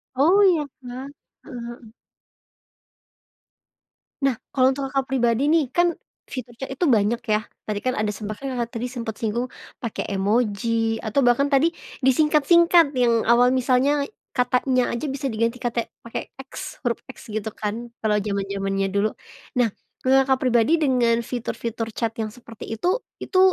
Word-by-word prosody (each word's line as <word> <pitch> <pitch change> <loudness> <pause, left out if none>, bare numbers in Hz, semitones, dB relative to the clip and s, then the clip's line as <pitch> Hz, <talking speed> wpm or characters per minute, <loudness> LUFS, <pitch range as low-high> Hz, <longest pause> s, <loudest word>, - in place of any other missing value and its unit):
Oh, 325 +9 +5
iya 345 -5 +4 0.2
kah? 250 +2 -7 0.4
Heeh 250 -6 -8
heeh. 240 -2 -10 2.3
Nah, 270 -3 +2 0.2
kalau 260 -1 +5
untuk 275 -1 -3
Kakak 270 -1 0
pribadi 250 +2 +2
nih, 320 -1 +4
kan 350 -1 +3 0.3
fitur 245 -2 -6
chat 270 - -5
itu 270 +6 -1
banyak, 230 -3 +3
ya. 215 -1 +2 0.2
Tadi 210 -1 -2
kan 255 0 0
ada 215 -1 0
sempat 215 +1 -5
kan 265 -1 -3
Kakak 235 -1 -2
tadi 245 +2 -2
sempat 230 -4 -5
singgung, 235 +3 -1 0.3
pakai 230 -3 -3
emoji, 225 +2 +1
atau 235 +5 +1
bahkan 245 +4 +4
tadi 305 +5 +3 0.3
disingkat-singkat 310 +3 +5
yang 235 -2 +3
awal 240 +2 +5
misalnya 260 +3 +2 0.3
katanya 250 0 +2
aja 235 +6 -3
bisa 275 -1 -2
diganti 230 +2 0
kata 235 -1 -1 0.2
pakai 230 - -6 0.2
X, - - -8
huruf 240 -2 -1
X, 260 -3 -12
gitu 215 0 -3
kan 230 +3 -5
kalau 215 -1 +2
jaman-jamannya 195 -1 -1
dulu. 205 +2 +2 0.5
Nah, 235 -2 +4 0.3
kalau 265 +1 +5
Kakak 265 -1 +3
pribadi 240 +1 +3
dengan 245 -5 +3
fitur-fitur 235 -1 -4
chat 230 -2 -1
yang 215 - -2
seperti 235 -3 -11
itu, 360 - +1 0.2
itu 370 - +1
240 Hz, 155 wpm, -23 LUFS, 225-270 Hz, 2.3 s, Oh